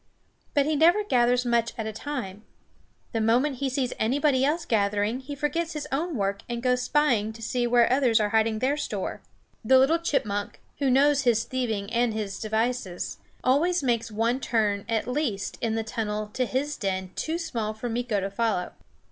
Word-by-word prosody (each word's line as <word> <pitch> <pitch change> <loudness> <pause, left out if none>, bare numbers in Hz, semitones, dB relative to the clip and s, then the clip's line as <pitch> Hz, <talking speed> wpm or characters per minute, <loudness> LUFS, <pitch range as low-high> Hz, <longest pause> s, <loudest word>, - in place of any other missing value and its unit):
But 285 -1 +4
he 310 +1 +1
never 345 +8 +5
gathers 245 -7 +2
much 235 -1 +1
at 225 - -3
a 220 - -4
time. 215 -6 -5 0.7
The 225 - -1
moment 250 +5 +2
he 275 +1 -1
sees 260 -1 -1
anybody 265 +3 +2
else 310 +4 +1
gathering 210 +2 +1
he 275 +2 -7
forgets 320 +4 -1
his 300 -1 -5
own 315 +4 -1
work 200 -2 -1
and 235 0 -4
goes 250 0 +2
spying 250 -6 +2
to 225 - -12
see 245 +1 0
where 240 -1 +4
others 255 -5 +3
are 210 -1 +1
hiding 220 0 +2
their 265 +6 +1
store. - - -4 0.4
The 260 +4 +5
little 285 +6 +4
chipmunk, 210 -11 -2 0.2
who 275 -2 +2
knows 280 +2 +4
his 235 -4 +2
thieving 225 -5 -3
and 235 -2 +1
his 205 -2 -4
devices, 220 -4 -2 0.2
always 305 +6 +2
makes 235 -2 0
one 230 +4 0
turn, 210 -5 0
at 225 -1 0
least, 250 -7 -2
in 225 -1 0
the 225 - -1
tunnel 215 -2 -3
to 255 -1 0
his 290 +4 -2
den 190 -2 -2
too 320 +1 -2
small 230 -11 -3
for 220 +3 -5
Meeko 235 -3 -1
to 195 +1 -3
follow. 210 -3 -1
240 Hz, 185 wpm, -26 LUFS, 220-275 Hz, 0.7 s, never